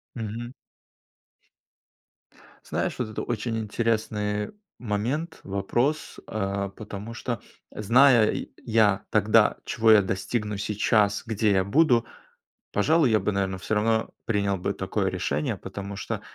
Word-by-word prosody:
Мгм. 115 +1 -5 2.1
Знаешь, - - -2
вот - - -2
это 110 - -4
очень 115 0 -2
интересный 105 -1 -1 0.3
момент, 125 +10 -2
вопрос, 120 +10 -1
а, 100 -1 -2
потому 105 +2 -8
что, 120 -2 -4 0.3
зная 115 +2 +4 0.2
я 110 -3 +3
тогда, - - +4
чего 110 0 +3
я 110 -2 +8
достигну 105 +2 -2
сейчас, 105 0 +1
где 110 -2 +1
я 95 -1 +3
буду,- 120 +2 +3 0.7
пожалуй, 150 +6 +3
я 110 - +4
бы, 105 - -1
наверно, 95 -1 -1
всё 110 - -2
равно 110 +1 +1
принял 100 -3 0
бы 95 +3 -1
такое 95 +1 -1
решение. 75 -5 -1
Потому 100 0 -7
что, 100 - -4
105 Hz, 120 wpm, -26 LUFS, 100-115 Hz, 2.1 s, я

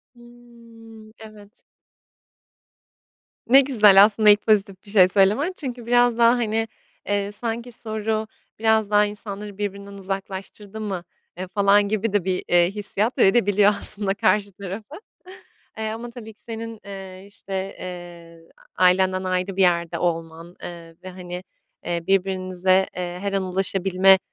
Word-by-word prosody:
Hımm. 235 -2 -16
Evet. 215 -2 -13 2.0
Ne 270 +2 +8
güzel 210 -7 +6
aslında 210 0 +4
ilk 205 0 +6
pozitif 200 -2 +1
bir - - -13
şey 190 -4 +6
söylemen 210 - +2
çünkü 250 -5 -5
biraz 245 -1 +3
daha, 235 0 +6
hani, 225 -2 0 0.4
eee, 205 0 -1
sanki 235 +2 -4
soru, 220 -1 -3 0.3
"Biraz 220 -2 +2
daha 210 0 +4
insanları 205 -1 -7
birbirinden 200 -1 -5
uzaklaştırdı 195 +2 -6
mı?", 190 -5 -4 0.3
eee, 185 +1 -5
falan 200 +1 +3
gibi 215 0 -1
de 205 -3 +2
bir, 185 -1 -1
eee, 175 0 +4
hissiyat 210 +4 -2
verebiliyor 205 -2 +4
aslında 200 -2 -2
karşı 210 -1 +1
tarafa. 200 +8 -8 0.8
Eee, 220 0 -3
ama 230 +2 -6
tabii 220 -2 -10
ki, - - -19
senin, 230 -1 -7
eee, 190 -1 -9
işte, 195 -1 -4
eee, 170 -2 -10 0.3
a-ailenden 185 +1 +3
ayrı 185 +1 -2
bir - - +2
yerde 170 -2 +2
olman, 165 0 -3
eee, 170 -1 -9
ve, 185 - -7
hani, 180 0 -8 0.4
eee, 170 -1 -2
birbirinize, 185 -1 +1
eee, 175 -1 -4
her 200 0 -3
an 195 -1 0
ulaşabilme 190 0 +3
200 Hz, 140 wpm, -23 LUFS, 185-220 Hz, 2.0 s, Ne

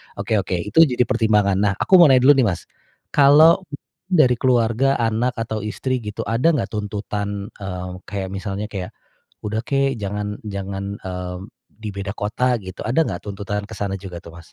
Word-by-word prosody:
Oke 105 +2 0
oke 95 -1 -2
itu 105 - 0
jadi 125 -2 +1
pertimbangan. 105 -5 +2
Nah, 100 0 +2
aku 185 - +4
mau 170 - +9
nanya 130 -2 +5
dulu 140 - +8
nih 125 - +4
Mas, 90 - -2 0.5
kalau 150 +4 +6 0.5
dari 135 -10 +3
keluarga 125 +1 +2
anak 115 +1 0
atau 115 -1 -3
istri 125 +5 -2
gitu 105 -2 -5
ada 115 +7 0
nggak 100 - -2
tuntutan, 105 0 -4
eee, 90 -2 -5 0.2
kayak 100 -2 -4
misalnya 100 +1 -4
kayak, 95 -3 -5 0.6
"Udah 110 +2 -2
kek 135 +1 0
jangan 105 +1 -4
jangan, 100 -1 -5
mmm, 90 -1 -6 0.4
di 110 - -5
beda 100 0 -4
kota," 125 +4 0
gitu. 95 -1 -8
Ada 130 +8 +3
nggak 90 - -5
tuntutan 105 0 -4
ke - - -11
sana 100 -1 -2
juga 90 -3 -8
tuh, 85 -2 -12
Mas? 85 - -16
105 Hz, 180 wpm, -21 LUFS, 100-125 Hz, 0.6 s, mau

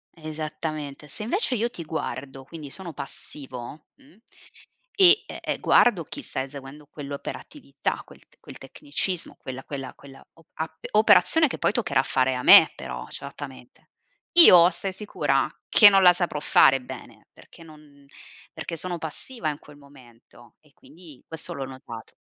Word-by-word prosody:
Esattamente. 155 -2 -6
Se, 150 - -5
invece, 265 - 0
io 235 +1 -1
ti 175 - -9
guardo, 140 -4 -6
quindi 150 0 -11
sono 180 -1 -7
passivo, 135 0 -9
mhmm, 275 -2 -23 0.8
e, 380 +2 +7
ehm, - - -5
guardo 205 -9 +3
chi - - -7
sta 130 - -4
eseguendo 140 +2 -10
quell'operatività, 140 - -6
quel - - -18
t - - -30
quel - - -12
tecnicismo, 145 +6 -3
quella 130 0 -8
quella 135 -3 -7
quella 135 -1 -16
o 165 - -23
a 160 0 -6 0.2
operazione 225 +9 +5
che - - -7
poi - - +1
toccherà 230 +1 0
fare 130 0 0
a 125 - -4
me, - - +8
però, - - -8
certamente, 140 -3 -10 0.5
io 175 - +9
stai 195 -1 -5
sicura 210 +2 -1 0.2
che 210 - +8
non 195 -1 +4
la 180 -1 +7
saprò 175 -4 -3
fare 135 -2 +4
bene 125 - -12
perché - - -18
non 150 -3 -18 0.5
perché 170 - -7
sono 175 +2 -2
passiva 160 - -5
in 145 - -10
quel 150 -1 -17
momento. 120 -4 -19
E, 150 -2 -28
quindi, 160 -4 -17
questo 160 -1 -5
l'ho 135 - -5
notato. 130 -4 -11
150 Hz, 155 wpm, -24 LUFS, 135-180 Hz, 0.8 s, io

